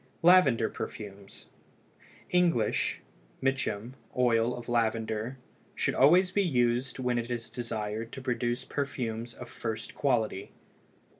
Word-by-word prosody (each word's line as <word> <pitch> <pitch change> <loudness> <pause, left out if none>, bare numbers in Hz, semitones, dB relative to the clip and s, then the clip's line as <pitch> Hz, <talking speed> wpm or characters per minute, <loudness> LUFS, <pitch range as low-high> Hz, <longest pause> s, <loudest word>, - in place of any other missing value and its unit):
LAVENDER 150 -11 +6
PERFUMES. 100 -2 -8 0.9
English 170 -12 +2 0.4
(Mitcham) 130 -4 -1 0.2
oil 120 -1 +3
of 120 - -9
lavender 115 0 0 0.4
should - - 0
always 180 +7 +5
be 200 - +2
used 125 -6 +1
when 125 -2 0
it 120 0 -4
is 120 -1 -4
desired 115 -2 -4
to 135 - -6
produce 120 -1 -1
perfumes 120 -5 -3
of 125 - -9
first 110 -2 -5
quality. 115 -8 0
120 Hz, 115 wpm, -29 LUFS, 115-135 Hz, 0.9 s, LAVENDER